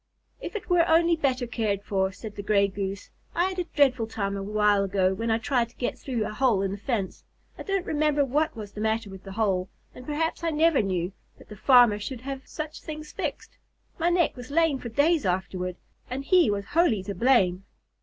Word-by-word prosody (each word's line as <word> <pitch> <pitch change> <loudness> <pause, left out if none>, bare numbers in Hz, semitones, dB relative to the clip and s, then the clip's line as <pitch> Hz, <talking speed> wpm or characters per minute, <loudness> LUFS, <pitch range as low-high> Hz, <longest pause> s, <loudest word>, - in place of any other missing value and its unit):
"If - - -6
it 430 - -5
were 355 -2 +4
only 335 +1 +4
better 265 -5 0
cared 215 -4 -2
for," 190 -2 0
said 210 +1 -9
the - - -5
Gray 200 -1 +3
Goose. 195 0 -5 0.2
"I 350 +2 +2
had 375 -1 -5
a 355 - -1
dreadful 260 -8 +2
time 200 -3 -3
a 195 - -4
while 210 0 +2
ago, 190 -1 +1
when 230 +4 -3
I 225 - +3
tried 240 0 0
to 245 - -25
get 245 - -2
through 240 -5 -2
a - - -5
hole 225 -4 +2
in 195 - -1
the 200 - -4
fence. 205 -3 -3 0.3
I - - -10
don't 390 -2 -1
remember 295 -2 +1
what 300 +4 0
was 210 -3 -8
the 210 - -7
matter 220 -1 -1
with 190 -1 -11
the 195 - -8
hole, 190 -4 0 0.2
and 250 - -11
perhaps 315 +4 -2
I 335 - +1
never 320 -2 +3
knew, 185 -2 -1 0.3
but - - -17
the 210 - -9
farmer 240 -2 +5
should 230 +3 -6
have 270 0 -6
such 305 -1 -6
things 305 -1 -7
fixed. - - -5 0.4
My 335 +1 +2
neck 345 -2 +2
was 245 -1 -9
lame 310 -2 +2
for 240 - -6
days 295 +6 +2
afterward, 185 -1 -2 0.3
and 270 +2 -4
he 360 - +5
was 200 -1 -1
wholly 305 - +3
to 200 - -4
blame." 195 -7 +2
230 Hz, 220 wpm, -26 LUFS, 200-300 Hz, 0.4 s, farmer